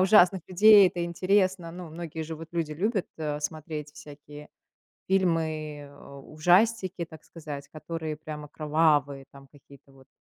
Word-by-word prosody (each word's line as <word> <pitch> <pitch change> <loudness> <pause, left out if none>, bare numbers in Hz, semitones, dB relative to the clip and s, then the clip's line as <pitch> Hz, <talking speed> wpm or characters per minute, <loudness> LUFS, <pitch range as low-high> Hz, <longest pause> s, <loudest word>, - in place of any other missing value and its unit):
ужасных 190 -1 +5
людей. 200 +1 +7
Это 175 -1 -4
интересно. 185 0 +1
Ну, 175 -2 -9
многие 160 -1 -6
же 160 +1 -6
вот 165 +1 -10
люди 165 -3 -2
любят, 195 +5 -1
а, 150 -2 -3
смотреть 155 0 -5
всякие 150 0 -12 0.6
фильмы, 160 -5 0
э, 140 - -16
ужастики, 185 +5 +1
так 160 -2 -14
сказать, 150 -4 -9
которые 160 -1 -6
прямо 150 -1 -8
кровавые 150 -3 +1
там 140 0 -15
какие-то 140 -1 -19
вот. 135 -1 -20
160 Hz, 140 wpm, -27 LUFS, 150-180 Hz, 0.6 s, людей